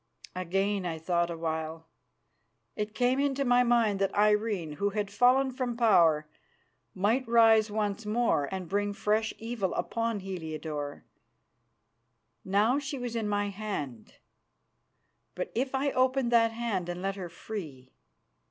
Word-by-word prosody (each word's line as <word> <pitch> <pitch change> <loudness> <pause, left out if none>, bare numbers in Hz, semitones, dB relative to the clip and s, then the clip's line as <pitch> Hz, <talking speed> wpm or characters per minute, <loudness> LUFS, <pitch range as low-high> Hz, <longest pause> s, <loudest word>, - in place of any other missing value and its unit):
Again 195 +2 0
I 170 -2 -3
thought 170 +1 0
a 170 - -5
while. 160 0 -4 0.9
It 210 0 -4
came 250 +1 +2
into 280 -1 0
my 245 0 +5
mind 230 -5 +2
that 195 0 0
Irene, 210 -5 +2
who 205 - +1
had 205 0 -3
fallen 255 +4 +4
from 250 -2 -3
power, 170 -10 +4 0.7
might 225 +7 +1
rise 225 -2 +5
once 210 0 -2
more 210 -9 +1
and 190 -2 -4
bring 205 +3 -1
fresh 215 +2 0
evil 225 -5 -3
upon 230 -2 -2
Heliodore. 155 -5 -5 1.4
Now 210 +8 +2
she 280 0 -5
was 245 -2 -4
in 220 -2 -1
my 205 0 0
hand, 190 - -6 1.2
but - - -4
if 260 +3 -1
I 275 +1 +1
opened 255 -1 +1
that 230 -1 +4
hand 225 -6 -2
and 175 +1 -5
let 195 0 -1
her 185 -3 -6
free 155 -9 -8
210 Hz, 140 wpm, -29 LUFS, 180-235 Hz, 1.4 s, my